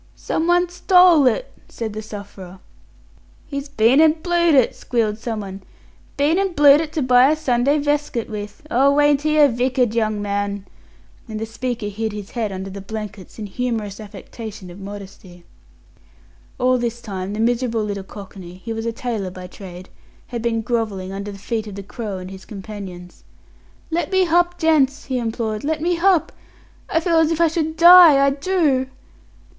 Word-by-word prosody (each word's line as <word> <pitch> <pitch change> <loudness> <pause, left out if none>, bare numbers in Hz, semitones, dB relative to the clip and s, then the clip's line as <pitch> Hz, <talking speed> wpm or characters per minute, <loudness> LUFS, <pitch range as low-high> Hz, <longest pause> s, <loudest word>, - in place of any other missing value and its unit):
"Someone 350 +2 +1
stole 360 -4 +5
it," 250 - -1 0.2
said 220 -2 -5
the 215 - -5
sufferer. 200 -3 -10 0.9
"He's 280 -1 -6
been 260 +1 +4
an' 315 -1 +6
blued 345 -3 +3
it," 260 -4 +3
squealed 220 -3 -1
someone. 205 -4 -5 0.6
"Been 300 +6 +2
an' 390 -2 0
blued 290 -1 +6
it 315 -2 -5
to 305 - -1
buy 250 +1 +5
a 310 - +3
Sunday 275 -1 +1
veskit 290 -4 -1
with! 210 +1 -7
Oh, 280 +4 +3
ain't 290 -1 +4
he 305 0 +1
a 295 -1 +7
vicked 250 -1 0
young 215 -2 0
man?" 200 -1 -3 0.6
And 215 -1 -5
the 225 - -3
speaker 235 0 -4
hid 215 +1 -3
his 205 -1 -8
head 225 -4 -2
under 190 0 -6
the 200 +1 -8
blankets, 210 -1 -8
in 215 - -5
humorous 215 -2 -3
affectation 210 -2 -9
of 180 - -12
modesty. 195 -3 -10 1.1
All 255 0 +2
this 235 0 -3
time 195 -4 -5
the 210 - -5
miserable 230 -1 0
little 200 -2 -4
cockney 190 -3 -11
he 225 +5 -6
was 225 +1 -4
a - - 0
tailor 225 -4 -4
by 185 0 -9
trade 180 0 -11 0.4
had 235 -2 -4
been 225 -1 -1
grovelling 215 -6 -2
under 200 +1 -5
the 200 - -10
feet 220 +2 -4
of 205 - -8
the 200 - -7
Crow 205 -1 -6
and 185 0 -8
his 190 0 -10
companions. 195 -4 -9 0.7
"Let 330 -1 -1
me 375 -1 +3
h'up, 350 +1 +2
gents" 310 -5 +2
he 260 -2 -2
implored 225 -2 -3
"let 310 +2 -1
me 345 +2 0
h'up. 360 -1 +2 0.6
I 325 - +2
feel 335 -1 +2
as 320 -1 +3
if 330 -1 -1
I 335 - +5
should 315 0 -2
die 335 -5 +8
I 275 - +3
do." 285 -3 +1
235 Hz, 175 wpm, -20 LUFS, 205-295 Hz, 1.1 s, die